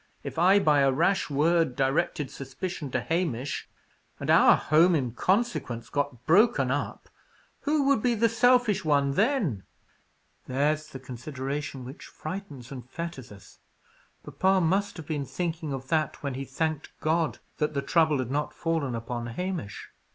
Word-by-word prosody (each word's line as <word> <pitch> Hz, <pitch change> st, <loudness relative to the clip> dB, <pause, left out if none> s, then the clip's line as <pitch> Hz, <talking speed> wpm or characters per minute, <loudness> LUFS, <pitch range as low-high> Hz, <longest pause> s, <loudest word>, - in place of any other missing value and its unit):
If -, -, -5 dB
I, 185 Hz, +4 st, +6 dB
by 150 Hz, -7 st, +4 dB
a 135 Hz, -1 st, +4 dB
rash 170 Hz, +8 st, +1 dB
word, 155 Hz, -1 st, +2 dB
directed 140 Hz, +1 st, 0 dB
suspicion 145 Hz, +3 st, -5 dB
to 130 Hz, 0 st, -1 dB
Hamish, 145 Hz, -2 st, -2 dB, 0.5 s
and -, -, 0 dB
our -, -, +7 dB
home 165 Hz, +4 st, +4 dB
in 130 Hz, -6 st, -1 dB
consequence 155 Hz, -, -1 dB
got 145 Hz, -4 st, -2 dB
broken 170 Hz, -, +4 dB
up, 145 Hz, +1 st, -3 dB, 0.6 s
who 295 Hz, 0 st, +2 dB
would 275 Hz, -5 st, +3 dB
be 245 Hz, 0 st, +2 dB
the 230 Hz, +1 st, +3 dB
selfish 245 Hz, -2 st, +3 dB
one 140 Hz, -3 st, +2 dB
then?" 200 Hz, -, +1 dB, 0.9 s
"There's 150 Hz, +4 st, 0 dB
the 145 Hz, -, -8 dB
consideration 130 Hz, +1 st, -5 dB
which 130 Hz, +4 st, -10 dB
frightens 155 Hz, -8 st, -8 dB
and 125 Hz, -2 st, -8 dB
fetters 165 Hz, -7 st, -6 dB
us. 100 Hz, -2 st, -15 dB, 0.6 s
Papa 190 Hz, 0 st, +2 dB
must 195 Hz, +4 st, +1 dB
have 160 Hz, -, -8 dB
been 145 Hz, -3 st, -3 dB
thinking 165 Hz, -2 st, -3 dB
of 135 Hz, -1 st, -5 dB
that 155 Hz, -3 st, 0 dB
when 140 Hz, -2 st, -2 dB
he 135 Hz, +2 st, -5 dB
thanked 155 Hz, +3 st, -3 dB
God 160 Hz, 0 st, 0 dB, 0.2 s
that 150 Hz, -1 st, 0 dB
the 140 Hz, -, +1 dB
trouble 160 Hz, -4 st, +3 dB
had 130 Hz, -1 st, -3 dB
not 150 Hz, +2 st, -2 dB
fallen 160 Hz, -7 st, -1 dB
upon 120 Hz, +1 st, -4 dB
Hamish." 175 Hz, -, -5 dB
150 Hz, 155 wpm, -27 LUFS, 135-180 Hz, 0.9 s, our